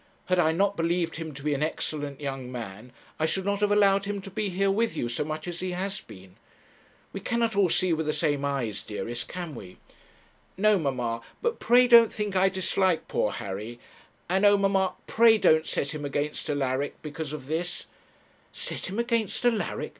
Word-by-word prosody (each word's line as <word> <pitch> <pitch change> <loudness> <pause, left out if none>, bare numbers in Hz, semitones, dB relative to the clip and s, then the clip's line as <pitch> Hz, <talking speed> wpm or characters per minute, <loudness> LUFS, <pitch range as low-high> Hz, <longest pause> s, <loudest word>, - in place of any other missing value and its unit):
Had 185 -1 +1
I 160 -2 +4
not 200 +4 +1
believed 170 -1 0
him 160 -1 -5
to 140 - -9
be 150 0 +1
an 140 - -2
excellent 145 -2 -2
young 135 -3 -5
man, 115 -1 -7 0.3
I 155 - +2
should 190 +4 -1
not 200 0 0
have 205 0 +2
allowed 200 -1 +4
him 205 0 -3
to 195 - -10
be 205 +2 -2
here 195 +2 +1
with 225 +3 0
you 120 - -1
so 120 +4 -2
much 155 +2 -5
as 175 0 -5
he 185 -1 -3
has 195 +2 -3
been. 95 - -14 0.8
We 195 - -4
cannot 230 +1 0
all 200 -3 +4
see 180 +1 +2
with 160 -1 -1
the - - +2
same 145 -2 0
eyes, 125 -8 -2
dearest, 115 +4 -5
can 175 -3 -6
we?' 95 -7 -10 0.8
'No, 210 0 +4
mamma; 125 -6 -2 0.2
but 470 0 -1
pray 245 +2 +5
don't 235 -2 +8
think 210 -2 -3
I 190 +1 +4
dislike 190 -2 +1
poor 105 - 0
Harry; 105 +5 -6 0.5
and, 190 +3 +1
oh! 205 0 +6
mamma, 195 -1 +1
pray 225 -1 +5
don't 160 -5 +4
set 140 - -1
him 150 -1 -5
against 145 +2 -3
Alaric 140 -1 -1
because 150 0 -5
of 150 -4 -6
this 165 +5 -3 0.3
' - - -34
'Set - - -5
him 195 - -5
against 235 -2 0
Alaric! 230 -3 0
170 Hz, 200 wpm, -27 LUFS, 140-200 Hz, 0.8 s, don't